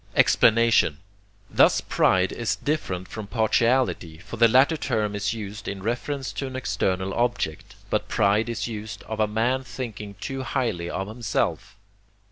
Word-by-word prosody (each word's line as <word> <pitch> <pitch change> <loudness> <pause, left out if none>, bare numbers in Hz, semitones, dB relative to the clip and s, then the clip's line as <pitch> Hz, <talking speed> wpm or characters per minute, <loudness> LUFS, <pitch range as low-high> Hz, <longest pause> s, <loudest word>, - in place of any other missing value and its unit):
Explanation 115 -9 +4 0.5
Thus - - +4
pride 95 0 +2
is 120 - -1
different 95 - -2
from 110 -2 -7
partiality, 115 -6 +1
for 100 +7 -9
the 115 +1 +6
latter 130 +7 +5
term 105 -8 -1
is 105 +2 -1
used 105 -1 -7
in 95 -1 -5
reference 130 +4 -3
to 135 - -3
an 130 - -7
external 95 -7 -1
object, 95 -6 -2 0.2
but 105 - 0
pride 105 +1 +2
is 115 - -2
used 110 -2 -7
of 110 0 -6
a 110 - +3
man 120 +5 0
thinking 105 -6 -7
too 135 0 -4
highly 115 -11 -2
of 95 +2 -3
himself. 110 -2 -2
110 Hz, 150 wpm, -25 LUFS, 100-120 Hz, 0.5 s, the